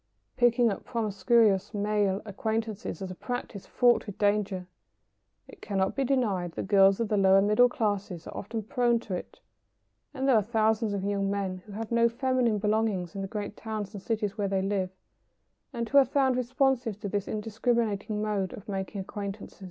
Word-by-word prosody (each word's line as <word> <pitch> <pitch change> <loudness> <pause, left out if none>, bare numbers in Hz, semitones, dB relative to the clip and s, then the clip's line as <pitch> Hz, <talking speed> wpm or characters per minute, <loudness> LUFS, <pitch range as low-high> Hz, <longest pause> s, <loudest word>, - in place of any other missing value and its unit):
] - - -48
Picking 240 -2 +4
up 195 - -5
promiscuous 210 -1 +2
male 205 -1 0
acquaintances 220 -2 -3
is 185 - -5
a - - -5
practice 210 0 -6
fraught 245 -2 +3
with 205 - -7
danger. 205 -3 +1 0.8
It - - -15
cannot 195 -2 -1
be 275 - +1
denied 210 -10 0
that - - -4
girls 195 0 +5
of 230 - 0
the 210 - 0
lower 195 0 +6
middle 210 +5 +4
classes 205 - -2
are - - -9
often 220 +2 -4
prone 240 +2 +1
to 205 - -6
it; 180 - -6 0.7
and 270 -2 -2
there 270 - +5
are 215 - +5
thousands 220 0 +1
of 195 -1 -2
young 200 0 0
men 195 -2 -2
who 205 - -10
have 225 +2 -5
no 235 0 +4
feminine 245 -2 +1
belongings 210 -4 0
in 195 - -5
the 195 - -3
great 205 0 -5
towns 215 -2 -5
and 200 - -7
cities 210 -1 -2
where 200 - +1
they 190 -1 0
live, 195 -2 -1 0.8
and 235 -3 -3
who 280 +4 +6
are - - +7
found 265 -2 +2
responsive 250 -3 0
to 205 - -3
this 200 0 -2
indiscriminating 215 -1 -1
mode 200 -3 -1
of 200 - -10
making 195 0 -4
acquaintances. 200 +1 -7
210 Hz, 185 wpm, -28 LUFS, 195-230 Hz, 0.8 s, are